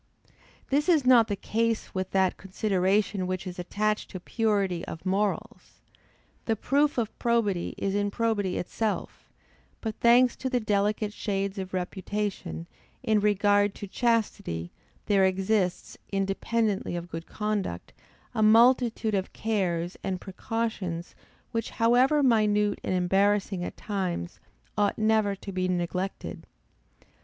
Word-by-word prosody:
This 295 +5 +2
is 310 -6 +4
not 240 -3 +6
the 205 - -1
case 225 +2 -1
with 185 0 -2
that 190 -1 +2
consideration 195 0 0
which 185 0 -3
is 180 -1 -6
attached 210 +4 -1
to 185 - -6
purity 200 -4 0
of 160 - -8
morals. 210 +4 -2 0.7
The 225 - +1
proof 285 +6 +1
of 225 -3 -1
probity 220 -7 0
is 195 - -1
in 205 0 +1
probity 205 -4 0
itself; 215 +4 -3 0.5
but, 220 -2 -3
thanks 245 +1 +5
to 260 - -3
the 250 -1 +1
delicate 210 0 0
shades 195 -1 -2
of 190 -1 -5
reputation, 190 -1 -3 0.4
in 215 -1 +3
regard 205 0 +3
to - - -6
chastity, 200 - -1 0.3
there 200 -2 +3
exists, 190 0 0
independently 195 +1 0
of 175 0 -6
good 165 0 -6
conduct, 210 - -3 0.4
a - - -1
multitude 230 0 +4
of 190 -1 -1
cares, 180 -5 -1
and 185 -1 -2
precautions, 190 -4 -4 0.4
which, 230 -1 -2
however 255 +6 +3
minute 210 -4 +3
and 185 - -1
embarrassing 195 +1 +2
at - - -6
times, 185 - -3 0.4
ought 205 -1 +1
never 215 -2 +2
to 195 +1 -8
be 185 -1 -1
neglected. 180 +2 -3
205 Hz, 130 wpm, -27 LUFS, 185-220 Hz, 0.7 s, not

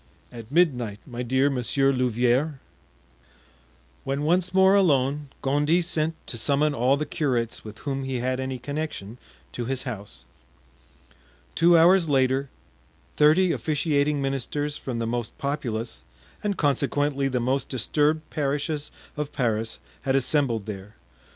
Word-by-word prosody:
"At 115 0 -10
midnight, 125 - +2
my 125 -3 -6
dear 130 +3 +2
Monsieur 135 +2 +1
Louvieres." 125 +4 +1 1.5
When 140 +2 -2
once 180 +3 +2
more 190 +1 +5
alone 145 -6 +2
Gondy 150 +5 +2
sent 160 -1 -1
to 120 - -4
summon 145 +5 +2
all 130 +2 +2
the 150 - -2
curates 125 -7 -1
with 110 0 -9
whom 135 -1 -2
he 135 -1 -3
had 130 +1 -1
any 130 0 -3
connection 125 -5 -5 0.3
to 120 - -4
his 130 +1 -2
house. 100 - -7 1.3
Two 170 0 +5
hours 170 0 +5
later, 135 0 +2 0.7
thirty 160 +5 +5
officiating 150 -2 0
ministers 140 +2 -2
from 130 -5 -5
the 115 - -1
most 120 0 -3
populous, 120 - -3 0.4
and 205 -3 -1
consequently 140 0 +1
the 130 -2 -1
most 130 +3 0
disturbed 150 +5 +1
parishes 145 +1 -2 0.3
of 150 -1 -4
Paris 115 -3 -1 0.2
had 135 0 0
assembled 130 -5 +1
there. 105 0 -8
135 Hz, 130 wpm, -25 LUFS, 125-150 Hz, 1.5 s, more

